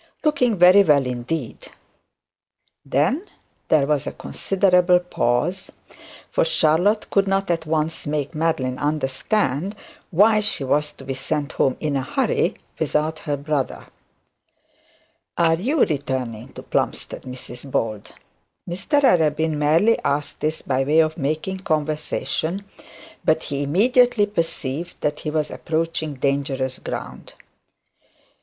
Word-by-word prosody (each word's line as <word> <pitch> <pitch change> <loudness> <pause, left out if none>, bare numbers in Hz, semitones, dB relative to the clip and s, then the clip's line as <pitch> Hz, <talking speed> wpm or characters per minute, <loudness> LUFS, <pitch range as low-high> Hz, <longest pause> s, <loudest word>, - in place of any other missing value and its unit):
Looking 250 -8 +2
very 180 +3 +8
well 145 -7 +4
indeed.' 125 +2 -4 1.2
Then 155 - 0 0.4
there 150 -3 +4
was 145 -2 0
a - - -2
considerable 180 -2 +2
pause: 175 +1 -1 0.6
for - - +2
Charlotte 205 - +2
could 200 0 +3
not 195 -1 +1
at 165 -2 -2
once 155 0 -1
make 145 0 -2
Madeline 150 -5 -1
understand 150 - -1 0.3
why 215 +5 +5
she 210 -9 -1
was 150 +3 +1
to - - -14
be 135 0 -3
sent 145 +2 -3
home 135 -2 +1
in 150 -2 -1
a 135 - +1
hurry 130 - 0 0.2
without 155 +1 0
her 145 -1 -2
brother. 140 -1 -2 1.5
'Are 165 -1 +4
you 260 - +2
returning 130 -5 -3
to - - -9
Plumstead, - - -2
Mrs 125 +1 -9
Bold?' 110 -5 -2 0.6
Mr 195 - 0
Arabin 160 - +3
merely 165 +10 +3
asked 140 +1 -2
this 155 +1 -2
by 130 0 0
way 150 +4 +2
of 155 0 0
making 155 +6 -2
conversation, 155 +2 -2 0.6
but 160 0 +2
he 140 0 -3
immediately 230 - +3
perceived 165 -5 -3
that 150 - -1
he 155 - -4
was 150 -1 -1
approaching 160 -2 -2
dangerous 135 -1 -1
ground. - - -7
155 Hz, 125 wpm, -22 LUFS, 140-180 Hz, 1.5 s, very